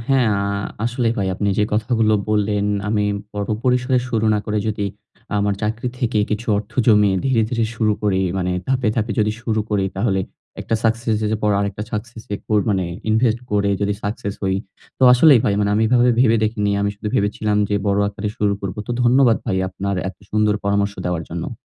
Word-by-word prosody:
হ্যাঁ, 130 -4 +3
আ - - -1 0.4
আসলেই 120 -1 0
ভাই 95 -1 0
আপনি 100 +2 -1
যে 105 - +4
কথাগুলো 110 0 +2 0.2
বললেন 105 -1 +1 0.2
আমি 105 -1 +1 0.3
বড় 105 0 -2 0.2
পরিসরে 125 0 +2
শুরু 110 -2 0
না - - +1
করে 105 0 0
যদি 105 -1 -2 0.5
আমার 100 0 +1
চাকরি 115 +3 -1
থেকে 115 -3 0
কিছু 110 +2 -2
অর্থ 105 0 -8
জমিয়ে 105 -3 +4
ধীরে, 125 -4 +3
ধীরে 115 -2 0
শুরু 110 -1 +2
করি 100 -3 +1 0.2
মানে 90 0 -1 0.2
ধাপে, 130 -3 +1
ধাপে 110 -1 0
যদি 105 0 +1
শুরু 110 -2 0
করি 100 -2 +1
তাহলে 95 -1 +1 0.4
একটা 115 - -2
সাকসেস 115 0 +1
স - - -4
এর 105 - -1
পর 105 - +2
আরেকটা 100 0 -2
সাকসেস 110 +1 -5
এ - - -2
কোর 105 -1 +2
মানে 95 -2 +1 0.3
ইনভেস্ট 110 +1 +2
করে 100 -1 +2
যদি 100 0 0
সাকসেস 100 -1 -3
হই। 95 -1 +1 0.4
তো - - -3
আসলেই 130 0 +6
ভাই 100 - +2
মানে 100 0 +1
আমি 110 - +2
এভাবে 125 +1 +4
ভেবে 115 -3 +4
দেখিনি। 105 -1 0
আমি 100 0 +1
শুধু 105 - -4
ভেবেছিলাম 105 +1 0
যে 105 - 0
বড় 100 0 +2
আকারে 105 +1 -4
শুরু 105 -1 +1
করব। 100 0 -5
তো - - -5
ধন্যবাদ 120 -2 +4
ভাই 95 - 0
আপনার 100 +2 -3
এত 95 - -9
সুন্দর 105 0 +2
পরামর্শ 100 0 +1
দেওয়ার 90 -2 -1
জন্য। - - -4
105 Hz, 200 wpm, -20 LUFS, 100-115 Hz, 0.5 s, আসলেই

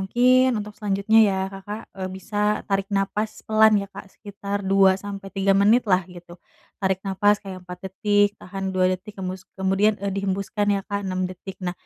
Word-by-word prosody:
mungkin 250 +6 +4
untuk 210 0 -7
selanjutnya 205 +1 +2
ya, 195 - 0 0.2
Kakak 205 +3 -7
e - - -9 0.2
bisa 190 +3 -8 0.3
tarik 195 -1 0
nafas 210 +2 -1 0.2
pelan 220 0 +5
ya 200 - -5
Kak, - - -8
sekitar 200 -1 -5
2-3 195 0 +2
menit 210 +5 +5
lah 185 -1 +4
gitu. 175 -1 -12 0.4
Tarik 190 -1 0
nafas 205 +2 +3
kayak 190 -2 -9
4 180 0 -9
detik, 205 +2 +2
tahan 195 +1 -6
2 185 - +3
detik, 185 +3 -7
hembus 185 0 -5
kemudian, 195 +3 +2
e 200 - -1
dihembuskan 195 +2 -2
ya 200 - -1
Kak 200 -1 -2
6 185 0 -1
detik, 185 +1 -9
nah 180 - -1
195 Hz, 170 wpm, -23 LUFS, 190-205 Hz, 0.4 s, pelan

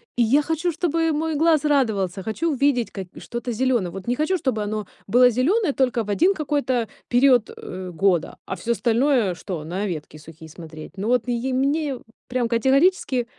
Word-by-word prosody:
и 240 - +3
я 270 +7 +4
хочу, 325 +3 -1
чтобы 330 0 0
мой 315 +1 -1
глаз 315 0 +3
радовался! 205 -10 +1
Хочу 300 - -1
увидеть 265 -3 +1
ка 195 - -6
и 180 - -11
что-то 240 +1 -5
зелёное! 235 -6 0
Вот 195 +4 -9
не 245 - +1
хочу, 340 +6 0
чтобы 255 -9 -1
оно 210 -1 -4 0.2
было 245 +4 +6
зеленое 290 - +1
только 250 -3 +1
в 210 - -10
1 345 - +3
какой-то 285 - -1 0.2
период, 245 -2 +4
э, 185 0 -7
года, 175 0 0
а - - -4
всё 235 - -3
остальное 235 -4 +2
что- 175 -3 -6
на 185 +6 -3
ветки 155 -4 -6
сухие 160 +1 -13
смотреть? 160 0 -11
Ну 205 +4 -2
вот 250 0 +1
и 245 +2 -1
мне 275 0 0 0.3
прям 245 -1 0
категорически 265 +2 +2
245 Hz, 185 wpm, -23 LUFS, 200-285 Hz, 0.3 s, было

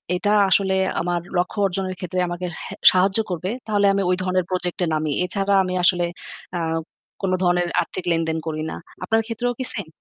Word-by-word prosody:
এটা 205 +3 0 0.2
আসলে 190 0 +3 0.3
আমার 175 0 0 0.2
লক্ষ্য 180 +4 -1
অর্জনের 185 0 -2
ক্ষেত্রে 185 0 -3
আমাকে 175 +1 -4 0.2
হে - - -7 0.2
সাহায্য 190 +2 +3
করবে, 180 +1 -3 0.2
তাহলে 205 -2 +2
আমি 200 - +1
ওই 180 - +3
ধরনের 185 -1 +1
প্রজেক্টে 180 -1 -1
নামি। 155 -1 0
এছাড়া 195 +2 0
আমি 185 -1 -3
আসলে 175 -1 +4 0.5
অ্যাঁ 165 -2 -1 0.4
কোন 195 -2 0
ধরনের 175 0 +2
আর্থিক 185 - -5
লেনদেন 165 -1 0
করি 155 -1 -2
না। - - -5 0.3
আপনার 225 +4 +2
ক্ষেত্রেও 240 +2 -2
কি 260 - -1
সেম? 200 -7 -4
185 Hz, 180 wpm, -22 LUFS, 175-195 Hz, 0.5 s, আসলে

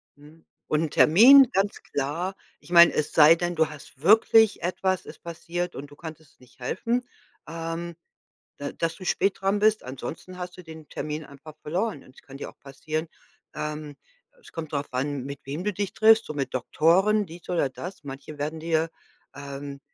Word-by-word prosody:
Mhm. 150 +3 -18 0.2
Und 155 +1 +1
'n 160 - -2
Termin, 255 - +8
ganz 195 +1 0
klar 165 +7 -3 0.2
ich 170 - -17
meine, 170 0 +8
es 150 - -1
sei 155 +1 +8
denn, 175 +1 -2
du 160 -1 +2
hast 140 -2 -13
wirklich 220 +4 +5
etwas 185 +1 -1
ist - - -12
passiert 170 +1 -4
und 140 +2 -7
du 145 - -15
konntest 160 -2 -11
nicht 125 +1 -22
helfen, 230 - -1 0.5
ähm, 165 +1 -5 0.6
da 145 0 -5
dass 165 0 -2
du 185 - -10
spät 195 +2 +1
dran 195 +1 +1
bist, 215 +1 +3
ansonsten 135 +8 -7
hast 180 0 -7
du - - -9
den 160 -2 -12
Termin 150 +1 -4
einfach 140 +2 -13
verloren 180 +1 -2
und 130 - -19
es - - -17
kann 135 - -14
dir 140 - -6
auch - - -20
passieren 155 +4 -5 0.5
ähm, 150 -1 -5 0.5
es - - -16
kommt 160 -2 -7
darauf 140 0 -3
an, 135 +1 -2
mit 140 0 -7
wem 145 +6 -5
du 210 - 0
dich 200 +1 -3
triffst, 220 +1 +5
so - - -6
mit 135 -3 -3
Doktoren, 190 - +2
dies 170 0 -13
oder 170 -6 +1
das, 180 +6 -9
manche 140 +2 -9
werden 155 +2 -3
dir 165 0 0 0.5
ähm, 140 0 -7
160 Hz, 185 wpm, -26 LUFS, 145-180 Hz, 0.6 s, Termin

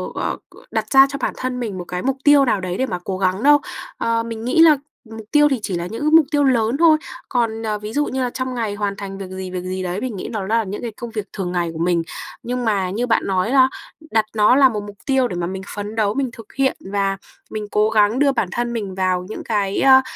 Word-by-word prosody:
ờ, - - -2
c - - -20 0.2
đặt 220 -1 -2
ra 270 0 +8
cho 280 - -4
bản - - -1
thân 255 -1 -3
mình 215 -6 -4
một 180 - -6
cái 180 +1 -4
mục 270 0 0
tiêu 290 -1 +6
nào 215 -6 +1
đấy 180 0 -3
để 260 - +1
mà 180 -8 -4
cố 190 0 -3
gắng 190 +3 0
đâu. 290 +1 +6 0.4
Ờ, 230 0 0
mình 230 -1 -6
nghĩ 255 +6 +3
là 315 -3 +7 0.3
mục 220 -1 -9
tiêu 295 0 +6
thì 270 -3 0
chỉ 195 -3 -3
là 170 +1 -4
những 225 +7 -6
cái 305 +1 +1
mục 320 -1 +7
tiêu 290 -1 +3
lớn 245 -2 +2
thôi. 320 -1 +6 0.3
Còn, 230 -3 0
ờ, 215 -1 -1
ví 210 +1 -7
dụ 295 +2 +1
như 265 -2 -2
là 250 - 0
trong 260 +1 -4
ngày 220 -4 -2
hoàn 205 -1 -2
thành 195 -1 -7
việc 195 -1 -7
gì, 185 0 -6
việc 180 -1 -3
gì 185 0 -4
đấy 180 +2 -3
mình 250 -3 -3
nghĩ 185 - -5
nó 215 -4 -3
là 225 +2 +2
những 200 0 -6
cái 235 - -4
công 235 +2 -8
việc 215 -2 -4
thường 185 -3 -3
ngày 175 -1 -1
của - - -7
mình. 170 0 +2 0.4
Nhưng 250 0 -2
mà 200 -4 +1
như 230 +6 -2
bạn 225 - +3
nói 190 +3 0
la 265 -1 +5 0.4
đặt 220 -1 +2
nó 215 +3 +5
là 270 -1 +6
một 210 -3 -4
mục 205 0 -10
tiêu 265 -2 +2
để 185 - -5
mà 175 -1 -2
mình 190 +1 -5
phấn 205 +1 -5
đấu, 210 -2 +1
mình 270 0 -1
thực 225 -2 -13
hiện 270 -1 +1
và 195 -1 0 0.3
mình 215 -1 -4
cố 210 +1 +3
gắng 215 +2 +3
đưa 285 -1 +4
bản 230 -8 -1
thân 240 +3 -2
mình 205 -5 -4
vào 185 -1 0
những - - -6
cái, 205 -3 0
ơ, 265 -1 +7
220 Hz, 275 wpm, -20 LUFS, 195-255 Hz, 0.4 s, ra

